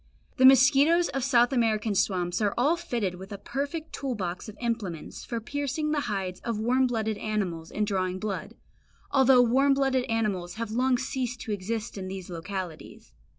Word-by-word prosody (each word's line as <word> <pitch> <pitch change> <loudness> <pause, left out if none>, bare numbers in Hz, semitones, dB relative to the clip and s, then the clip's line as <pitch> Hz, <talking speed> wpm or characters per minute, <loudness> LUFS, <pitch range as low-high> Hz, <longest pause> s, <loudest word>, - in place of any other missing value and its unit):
The 260 - +8
mosquitoes 280 +6 +5
of 270 - -2
South 245 -1 +4
American 220 -3 +1
swamps 180 -1 0
are 205 -2 +1
all 285 +8 +3
fitted 235 - -2
with 190 +2 -10
a 200 - -5
perfect 285 - -4
tool 270 -3 -3
box 185 0 -4
of 215 - -11
implements 225 -9 -4
for 235 - -4
piercing 285 +5 -2
the 305 - +1
hides 190 -3 -3
of 230 -2 -3
warm 255 +4 +2
blooded 220 -3 -2
animals 185 -7 -3
and 210 - -1
drawing 185 -2 -1
blood, 195 0 -4 0.6
although 265 -2 +6
warm 270 +4 +3
blooded 265 -2 +1
animals 200 -6 -1
have 230 -1 -4
long 250 +2 +2
ceased 255 -1 -3
to 225 - -5
exist 210 +2 -3
in 185 - -5
those 185 -1 -7
localities. 175 -1 -7
225 Hz, 175 wpm, -27 LUFS, 195-260 Hz, 0.6 s, The